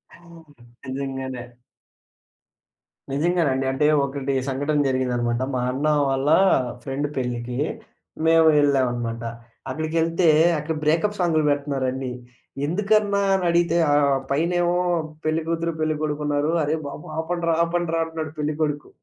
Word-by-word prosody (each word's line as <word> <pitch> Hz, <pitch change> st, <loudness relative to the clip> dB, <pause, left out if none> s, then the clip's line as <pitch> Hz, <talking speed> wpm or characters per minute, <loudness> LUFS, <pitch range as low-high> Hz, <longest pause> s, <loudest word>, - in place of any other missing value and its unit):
ఓహ్! 170 Hz, -3 st, -17 dB, 0.3 s
నిజంగానే. 130 Hz, -1 st, -4 dB, 1.7 s
నిజంగానండి. 145 Hz, -3 st, +1 dB
అంటే 135 Hz, +3 st, 0 dB, 0.2 s
ఒకటి 140 Hz, 0 st, -3 dB, 0.2 s
సంఘటన 145 Hz, +3 st, 0 dB
జరిగిందనమాట. 120 Hz, -2 st, 0 dB, 0.2 s
మా 125 Hz, -, 0 dB
అన్న 140 Hz, +4 st, -3 dB, 0.2 s
వాళ్ళ 135 Hz, +1 st, 0 dB, 0.6 s
ఫ్రెండ్ 140 Hz, +3 st, -2 dB
పెళ్ళికి, 125 Hz, -1 st, -3 dB, 0.7 s
మేము 165 Hz, 0 st, +5 dB
యెళ్ళామనమాట. 120 Hz, -5 st, 0 dB, 0.5 s
అక్కడికెళ్తే 165 Hz, +4 st, 0 dB, 0.3 s
అక్కడ 160 Hz, +2 st, -3 dB
బ్రేకప్ 165 Hz, +7 st, +1 dB
సాంగ్లు 165 Hz, -3 st, +2 dB
పెడుతున్నారండి. 135 Hz, -3 st, -1 dB, 0.5 s
ఎందుకన్నా 205 Hz, +4 st, +1 dB
అని 190 Hz, -2 st, +1 dB
అడిగితే 170 Hz, 0 st, +2 dB, 0.2 s
ఆహ్, 140 Hz, -2 st, +3 dB
పైనేమో 175 Hz, +4 st, +1 dB, 0.5 s
పెళ్లికూతురు 165 Hz, +1 st, -1 dB
పెళ్ళికొడుకు 155 Hz, -1 st, -1 dB
ఉన్నారు. 145 Hz, +2 st, +1 dB
అరే! 150 Hz, +2 st, 0 dB
బాబు 145 Hz, -, -8 dB
ఆపండ్రా! 170 Hz, 0 st, -1 dB
ఆపండ్రా! 170 Hz, -1 st, -1 dB
అంటున్నాడు 160 Hz, -1 st, -5 dB
పెళ్ళికొడుకు. 150 Hz, -1 st, -2 dB
150 Hz, 105 wpm, -23 LUFS, 135-165 Hz, 1.7 s, మేము